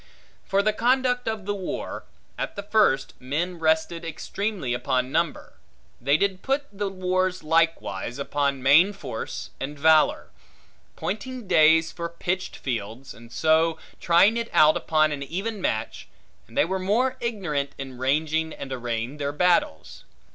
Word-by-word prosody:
For 195 +1 +2
the 215 +1 +2
conduct 250 +1 +1
of 220 -3 -3
the 205 - -1
war: 190 -3 -5 0.3
at - - -4
the 200 - -5
first, 205 -10 +2
men 165 +7 -3
rested 160 +1 +1
extremely 165 - -3
upon 130 +1 -1
number: 165 +1 -2 0.4
they 140 +4 +3
did 190 0 0
put 275 +2 0
the 200 0 -2
wars 185 -1 -1
likewise 155 -9 0
upon 140 -1 -1
main 165 +9 +6
force 115 - -6
and 145 +2 -5
valor; 155 +1 +3 0.6
pointing 235 +3 -5
days 160 -2 +5
for 170 0 -5
pitched 180 +2 -3
fields, 120 +1 -5
and 115 0 -15
so 160 +2 +2 0.2
trying 185 +7 +4
it 230 0 -3
out 155 0 +6
upon 155 -1 +2
an 145 -1 -4
even 195 +9 -4
match 110 -11 -2 0.4
and - - -13
they - - +5
were 190 +3 -2
more 235 +8 +1
ignorant 180 - -2
in 135 -2 -8
ranging 155 +4 0
and 135 -1 -7
arraying 120 +2 -3
their 140 -1 -2
battles. 160 - 0
165 Hz, 145 wpm, -25 LUFS, 140-195 Hz, 0.6 s, main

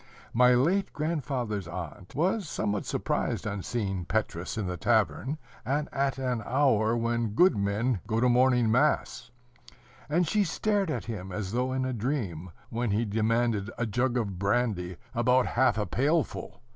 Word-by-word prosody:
My 125 +1 +5
late 180 +10 +2
grandfather's 130 - -2
aunt 90 +1 -7
was 180 +4 0
somewhat 105 -1 -2
surprised - - -1
on 100 -2 -3
seeing 95 -5 -2
Petrus 95 -3 -2
in 105 - -1
the 90 0 -3
tavern, 110 - +1 0.3
and 145 +5 -1
at 140 -1 0
an 125 -3 -1
hour 120 -3 +2
when 115 -2 -1
good 180 +1 +5
men 105 +3 0
go 110 0 0
to 125 - +3
morning 125 -2 +4
mass; 125 -2 +1 0.8
and 170 +3 +2
she 210 +5 +2
stared 200 +2 0
at 125 -8 -2
him 100 -5 -6
as 95 0 -4
though 125 +3 0
in 130 0 -1
a 130 - -2
dream, 105 - -3 0.2
when 120 0 -1
he 105 +3 +1
demanded 110 0 +1
a 120 - 0
jug 120 +3 0
of 100 -6 -2
brandy, 100 -4 0 0.2
about 125 +1 +3
half 120 -2 +2
a 105 - 0
pailful. 140 - -1
120 Hz, 160 wpm, -28 LUFS, 105-130 Hz, 0.8 s, My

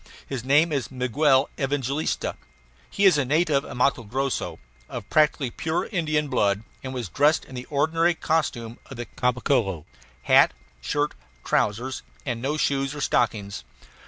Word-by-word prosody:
His 130 -4 -5
name 145 +5 +4
is 135 -7 -1
Miguel 135 +2 +2
Evangalista. 140 +1 -1 0.5
He 200 - +1
is 180 -6 +6
a - - +2
native 150 +1 +2
of - - -8
Matto 130 0 +2
Grosso, 130 +5 -2 0.3
of - - -6
practically 150 -4 +3
pure 160 +6 -1
Indian 155 -5 0
blood, 105 -6 +1 0.2
and 130 - -5
was 125 -5 -4
dressed 145 - +2
in - - -13
the 125 0 -6
ordinary 165 +4 +2
costume 120 -9 -1
of 135 - -9
the 120 - -4
Caboclo 120 - 0 0.4
hat, - - +5 0.3
shirt, 145 - -1 0.3
trousers, 120 +6 0 0.2
and 120 -4 -3
no 145 +4 -1
shoes 135 -1 0
or 150 - -5
stockings. 100 - 0
135 Hz, 150 wpm, -25 LUFS, 125-150 Hz, 0.5 s, is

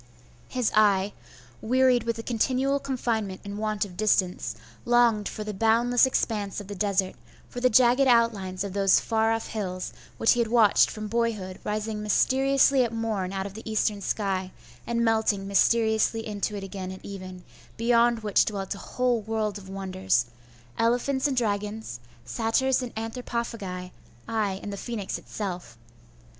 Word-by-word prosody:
His 250 -4 0
eye, 205 -2 +3 0.5
wearied 250 0 +3
with 230 -1 0
the 225 - -6
continual 260 +4 +1
confinement 230 -8 -2
and 200 +1 -6
want 215 -1 -1
of 185 -3 -12
distance, 180 - +1 0.3
longed 235 -3 +3
for 215 - -6
the 210 0 -5
boundless 230 +5 +3
expanse 210 -6 -1
of 205 - -9
the 205 - -6
desert, 195 -1 0 0.3
for 245 - -7
the 255 +1 +3
jagged 250 +3 +5
outlines 210 -6 +2
of 200 -2 -5
those 195 -1 +4
far 225 -1 +1
off 225 0 -1
hills, 185 -4 -4 0.2
which 225 - +4
he 240 - +2
had 235 - +2
watched 225 -2 +5
from 215 0 -6
boyhood 215 -5 -2
rising 210 0 -3
mysteriously 270 +5 +3
at 235 - -2
morn 220 -5 -2
out 195 0 -3
of 200 - -7
the 220 +1 -7
eastern 210 -1 0
sky, 190 -2 -2 0.4
and 235 0 +1
melting 220 -3 +1
mysteriously 220 +2 +2
into 210 0 -3
it 200 - -5
again 190 -1 -6
at 190 - -10
even, 185 -2 -8 0.3
beyond 235 0 +3
which 210 -2 +3
dwelt 195 -2 -3
a 200 - -10
whole 250 0 0
world 215 -1 -2
of 190 -1 -13
wonders, 190 -9 0 0.5
elephants 250 +4 +1
and 270 -2 -2
dragons, 210 - -2 0.3
satyrs 250 +4 +1
and 250 -2 -5
anthropophagi, 225 -5 -4 0.4
ay, 205 -4 -1
and 205 - -5
the - - -5
phoenix 210 -2 -4
itself. 180 - -6
215 Hz, 160 wpm, -26 LUFS, 195-235 Hz, 0.5 s, jagged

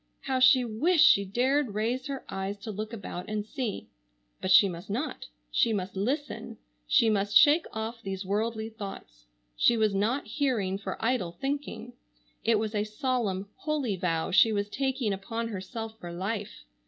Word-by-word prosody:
How 265 -1 -1
she 255 0 +6
wished 300 +10 +4
she 200 - +6
dared 250 +3 +1
raise 240 +5 -1
her 275 -2 -5
eyes 195 +1 -4
to 215 - -5
look 215 +2 -5
about 200 -4 -6
and 210 -1 -2
see. 220 - -4 0.5
But 185 - -2
she 190 +2 +8
must 175 +1 -7
not. 245 +10 -3 0.2
She 230 - +3
must 195 -2 -3
listen. 265 +9 -3 0.3
She 225 - +4
must 205 -1 +3
shake 300 +2 +6
off 225 +1 -5
these 195 -2 -5
worldly 220 +3 -1
thoughts. - - -9 0.3
She 235 - +4
was 215 -2 +2
not 220 +8 0
hearing 220 -10 -1
for 200 - -5
idle 225 -9 0
thinking. 270 -4 -4 0.5
It 225 0 +3
was 215 0 -2
a 210 -1 +1
solemn, 215 -3 -2
holy 290 -9 -1
vow 170 -3 -1
she 220 +4 +6
was 205 -1 -1
taking 265 -4 -1
upon 225 +4 -4
herself 220 +2 -6
for 175 - -7
life. 200 +4 -4
220 Hz, 165 wpm, -28 LUFS, 195-250 Hz, 0.5 s, she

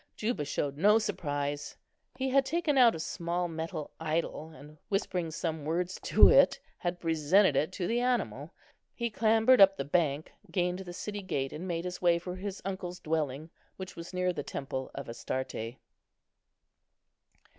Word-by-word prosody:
Juba 215 -9 -2
showed 140 0 -2
no 210 +7 +5
surprise; 145 -9 -3 0.4
he 265 +1 -2
had 270 +1 +4
taken 305 +2 0
out 245 -6 +6
a - - -6
small 170 +2 -2
metal 160 -1 -5
idol, 160 0 -2
and 155 -1 -14
whispering 185 -4 -1
some 160 -1 -3
words 175 +4 -2
to - - +6
it, - - +6 0.2
had 175 0 -2
presented 165 +1 +3
it 150 +5 +1
to 180 - -3
the 235 +6 +1
animal. 245 0 -1 0.4
He 235 -1 -2
clambered 225 +2 +4
up 195 0 +7
the 135 - -3
bank, 150 -1 0 0.2
gained 180 +1 0
the 185 -2 -7
city 205 +3 -5
gate, 140 -8 -2
and 175 +5 -6
made 170 -1 -2
his 180 0 -5
way 175 -1 +4
for 180 +1 -6
his 195 +1 -6
uncle's 185 -2 -4
dwelling, 155 -1 -2 0.3
which 185 -1 -7
was 170 0 -8
near 180 0 0
the 150 - -3
temple 135 -2 -5
of - - -6
Astarte. 120 -1 -4
175 Hz, 165 wpm, -30 LUFS, 155-195 Hz, 0.4 s, up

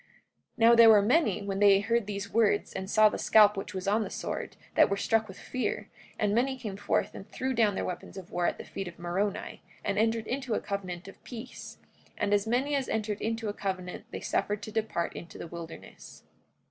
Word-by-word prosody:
44:15 - - -33 0.5
Now 230 0 +6
there 230 -1 +8
were 210 -2 +8
many, 235 - +2
when 195 -1 -3
they 200 -1 +6
heard 230 +1 0
these 200 -1 -5
words 215 -2 +2
and 190 0 -5
saw 215 0 +6
the - - -2
scalp 210 -1 +6
which 195 0 -6
was 185 0 -4
upon 210 +3 +2
the - - -5
sword, - - -5 0.2
that - - +5
were 200 - 0
struck 220 +2 +1
with 190 - -11
fear; 255 - -3 0.3
and 205 -1 +1
many 260 +4 +1
came 215 -6 -5
forth 205 - 0
and 200 - -10
threw 260 0 -2
down 220 -4 +3
their - - -2
weapons 180 +2 -6
of 185 -2 -9
war 175 0 +1
at - - -1
the - - -7
feet 195 - -6
of 175 - -9
Moroni, 180 +4 -2 0.2
and - - 0
entered 225 0 +1
into 255 -2 -2
a - - +1
covenant 185 -2 -5
of 195 - -13
peace. 245 0 -9 0.4
And 205 - 0
as 205 +1 +2
many 260 +5 +1
as 275 -2 0
entered 215 -2 -2
into 225 0 -2
a 205 - -2
covenant 185 -3 -4
they - - -6
suffered 205 0 -1
to 215 - -6
depart 215 -6 -1
into 170 - -9
the - - -6
wilderness. 165 -1 -10
210 Hz, 225 wpm, -29 LUFS, 195-225 Hz, 0.5 s, there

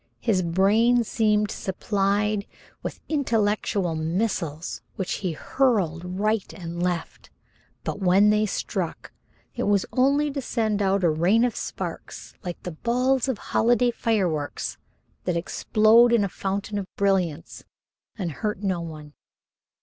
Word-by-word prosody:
His 210 -6 +1
brain 210 +8 +3
seemed 210 -2 +1
supplied 200 +1 0 0.3
with - - -5
intellectual 215 - 0
missiles 165 -1 -2
which 190 - -2
he 180 -4 -1
hurled 180 - 0
right 215 0 0
and 170 -2 -6
left, 175 -2 -3 0.5
but - - -3
when 195 +2 +5
they 210 0 +2
struck, - - -4 0.4
it - - -2
was 205 -2 +3
only 280 +3 +3
to 275 0 -3
send 220 -4 -1
out 195 -1 +2
a 170 - +5
rain 185 +10 +3
of 245 - -1
sparks - - -6
like 175 -1 -6
the 180 - -4
balls 250 +8 +1
of 255 - -1 0.2
holiday 240 +1 +3
fireworks 185 -11 -1 0.5
that 180 -2 0
explode 220 +6 +4
in 235 -3 +4
a 200 - -1
fountain 200 +2 -3
of 195 - -5
brilliance 185 -6 0 0.5
and 180 -5 -2
hurt 210 +5 -3
no 185 -3 0
one. 155 -3 -8
200 Hz, 135 wpm, -25 LUFS, 180-225 Hz, 0.5 s, when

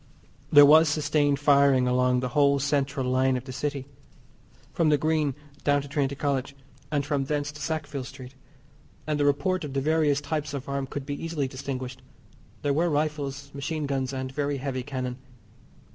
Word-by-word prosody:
There 145 -1 +9
was 155 +2 +7
sustained 145 -1 +1
firing 140 -3 +4
along 125 0 +2
the 125 - -2
whole 140 +2 +3
central 140 -1 0
line 130 0 +2
of 125 - -6
the 130 - -8
City, 140 0 -3 0.9
from 165 -2 +2
the 150 - +4
Green 155 -3 0 0.3
down 145 -1 +2
to - - -9
Trinity 140 -1 -1
College, 140 -1 -2 0.4
and 145 -2 0
from 145 -2 -1
thence 145 +1 -2
to 150 0 -11
Sackville 145 -2 -3
Street, 130 0 -10 0.7
and 150 -1 -1
the 145 - +2
report 185 +6 +1
of 145 -3 -6
the 135 - 0
various 150 0 +2
types 145 0 -3
of 135 -1 -6
arm 140 -1 -2
could 140 0 -6
be 145 +2 -5
easily 160 -4 -2
distinguished. 130 -1 -6 0.6
There 145 - +1
were 170 +4 +2
rifles, 145 -2 -2
machine 150 +2 -3
guns 135 -2 -1
and 130 -1 -4
very 145 0 -1
heavy 130 -1 -3
cannon. 125 -1 -4
140 Hz, 175 wpm, -26 LUFS, 135-150 Hz, 0.9 s, There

